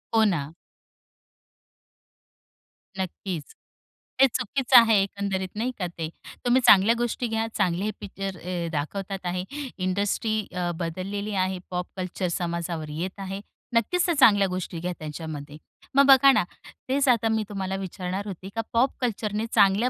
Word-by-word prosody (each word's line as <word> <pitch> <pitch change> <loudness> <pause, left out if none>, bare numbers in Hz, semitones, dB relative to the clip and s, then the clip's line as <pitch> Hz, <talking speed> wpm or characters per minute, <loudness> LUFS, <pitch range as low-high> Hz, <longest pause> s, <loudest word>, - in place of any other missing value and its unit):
हो 220 - +6
ना. 160 -7 -1 2.5
नक्कीच, 185 -3 -4 0.8
ते 270 - +9
चुकीचं 260 +2 +3
आहे, 225 -3 +5
एकंदरीत 195 -1 -3
नाही 245 +4 0
का 180 - -1
ते. 160 -1 -3 0.4
तुम्ही 245 +1 +4
चांगल्या 210 +1 +7
गोष्टी 240 +1 -1
घ्या, 225 0 -1
चांगले 185 +3 +1
पिक्चर 195 -2 -5
अ, 175 0 -3
दाखवतात 190 +6 -4
आहे, 180 +1 -1 0.3
इंडस्ट्री 200 +4 0 0.2
अ, 175 -1 -1
बदललेली 195 +5 -3
आहे, 185 -1 -3
पॉप 180 0 -2
कल्चर 185 0 -2
समाजावर 170 -2 -3
येत 185 +3 -4
आहे. 195 0 -5 0.3
नक्कीच 345 - +2
चांगल्या 205 -7 +6
गोष्टी 180 -2 -4
घ्या 180 +2 -2
त्यांच्यामध्ये. 150 -1 -7 0.4
मग 280 0 +7
बघा 275 0 +8
ना, - - +3 0.5
तेच 275 +1 +2
आता 230 -2 +3
मी 220 -1 +1
तुम्हाला, 195 -1 -3
विचारणार 190 +1 -4
होते 190 0 -7
का 225 - 0
पॉप 250 +4 +3
कल्चरने 215 -2 -1
चांगल्या 200 +5 +4
195 Hz, 140 wpm, -26 LUFS, 180-225 Hz, 2.5 s, ते